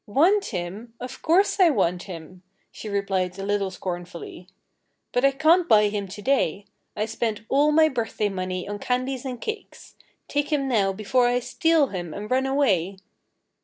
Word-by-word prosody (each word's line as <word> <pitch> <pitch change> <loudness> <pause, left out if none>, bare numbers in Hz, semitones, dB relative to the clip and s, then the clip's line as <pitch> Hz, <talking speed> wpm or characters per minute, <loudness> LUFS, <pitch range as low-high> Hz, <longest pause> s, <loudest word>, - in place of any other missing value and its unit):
"Want 350 - +3
him? 200 +4 -6
Of 250 +1 -8
course, 380 +5 +3
I 365 -3 +7
want 180 - 0
him!" 175 +1 -9 0.3
she 215 - -8
replied 195 -2 -1
a 195 - -5
little 200 -1 0
scornfully. 175 -1 -7 0.6
"But 245 - 0
I 275 - +7
can't 320 +6 +3
buy 210 -1 +6
him 205 -1 -3
to 205 +2 -9
day. 205 - +1 0.3
I 210 - -1
spent 220 -1 -2
all 290 +2 +4
my 315 +1 +5
birthday 230 -6 -1
money 185 -1 -4
on 205 0 -5
candies 255 +2 -2
and 250 -2 -4
cakes. 440 - -7 0.3
Take 290 +1 -1
him 280 -3 +1
now 205 -6 +2
before 215 +5 +1
I 245 0 +2
steal 320 +2 +2
him 175 -4 -5
and 210 +3 -7
run 260 +1 +2
away." 200 - +1
220 Hz, 170 wpm, -24 LUFS, 190-275 Hz, 0.6 s, I